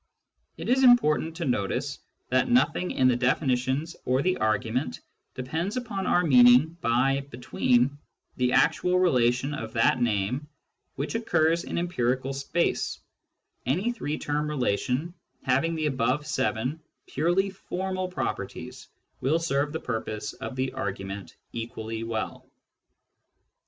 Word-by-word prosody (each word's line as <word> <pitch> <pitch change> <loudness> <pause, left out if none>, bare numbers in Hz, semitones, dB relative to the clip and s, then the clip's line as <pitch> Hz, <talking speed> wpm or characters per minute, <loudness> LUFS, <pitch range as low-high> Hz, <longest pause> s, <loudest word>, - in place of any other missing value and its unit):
It - - -6
is 265 +2 +3
important 165 -10 +4
to 170 -1 -3
notice 110 -7 -1 0.3
that 130 0 +2
nothing 240 -7 +2
in 130 - +2
the 125 - +4
definitions 130 +4 0
or 130 +2 +1
the 185 - +2
argument 110 -5 -1 0.4
depends 160 - -3
upon 210 -6 -3
our 175 - +3
meaning 130 +2 +6
by 130 +4 +2
" 140 0 -10
between 125 +2 +1 0.2
" - - -46
the 125 -1 +2
actual 180 +6 +3
relation 130 -5 +2
of 115 -5 -6
that 115 +2 +3
name 120 +5 0 0.5
which 140 +3 -3
occurs 170 -7 +1
in - - -4
empirical 135 -6 0
space: 140 +5 -1 0.7
any 185 - +1
three 155 -10 -3
term 150 +1 -2
relation 130 +3 -1 0.3
having 140 +6 +1
the 155 -1 -1
above 135 +1 0
seven 130 -1 -1 0.3
purely 175 +6 +1
formal 185 0 -3
properties 180 - -5 0.3
will 145 +5 +2
serve 145 -3 0
the 160 - -3
purpose 105 -1 -4
of 130 - -7
the 130 0 -2
argument 95 -5 -5 0.2
equally 115 -1 -5
well. 115 -1 -4
135 Hz, 130 wpm, -27 LUFS, 125-165 Hz, 0.7 s, meaning